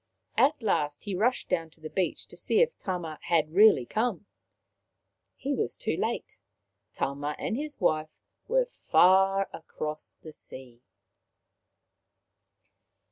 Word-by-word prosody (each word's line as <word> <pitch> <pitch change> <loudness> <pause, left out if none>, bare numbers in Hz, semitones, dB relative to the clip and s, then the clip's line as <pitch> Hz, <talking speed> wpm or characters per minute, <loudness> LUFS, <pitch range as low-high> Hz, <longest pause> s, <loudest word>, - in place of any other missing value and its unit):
At 290 +3 +3
last 150 -8 0
he 205 - -4
rushed 230 +7 +1
down 165 -3 -1
to 160 - -26
the 155 - -7
beach 185 -2 -1
to - - -13
see - - +1
if 485 0 +3
Tama 175 -5 -4
had 155 -2 +1
really 200 - +6
come. 215 - -1 1.1
He 280 +1 -3
was 240 - -2
too - - -1
late. - - -3 0.5
Tama 145 +4 -3
and - - -2
his 295 +2 -5
wife 155 -4 +1 0.4
were - - +3
far 195 - +3
across 155 -1 -6
the 155 - -12
sea. 125 -4 -13
180 Hz, 130 wpm, -28 LUFS, 155-220 Hz, 1.1 s, really